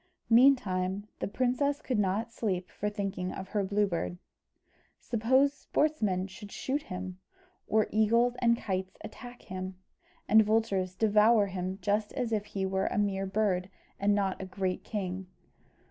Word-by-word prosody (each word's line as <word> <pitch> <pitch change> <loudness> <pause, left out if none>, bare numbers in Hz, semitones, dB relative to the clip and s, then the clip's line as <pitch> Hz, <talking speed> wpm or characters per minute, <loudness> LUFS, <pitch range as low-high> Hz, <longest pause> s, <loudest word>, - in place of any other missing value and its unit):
Meantime 205 -6 +4
the - - -2
princess 255 +6 0
could 250 -7 -1
not 210 +4 0
sleep 185 -6 -2
for 210 - -2
thinking 195 -3 -3
of 190 0 -7
her 205 -2 0
Blue 205 +2 +2
Bird. 175 -1 -3 0.8
"Suppose 260 +5 +2
sportsmen 220 -12 0
should 200 +1 -10
shoot 280 +3 -2
him, 185 -7 -6 0.5
or 215 0 +3
eagles 230 +3 +3
and 235 -1 +3
kites 190 -3 -3
attack 245 +3 -10
him, 185 0 -6 0.5
and 220 +1 +7
vultures 205 -4 +1
devour 215 +1 +5
him 185 -1 -4
just 210 +2 0
as 245 -3 -2
if 210 -2 0
he 195 -2 -3
were 190 0 0
a - - -2
mere 195 -2 0
bird 190 -2 0 0.3
and 205 +1 +3
not 195 -2 0
a - - -4
great 185 -1 -2
king? 190 -3 -4
205 Hz, 150 wpm, -30 LUFS, 190-225 Hz, 0.8 s, and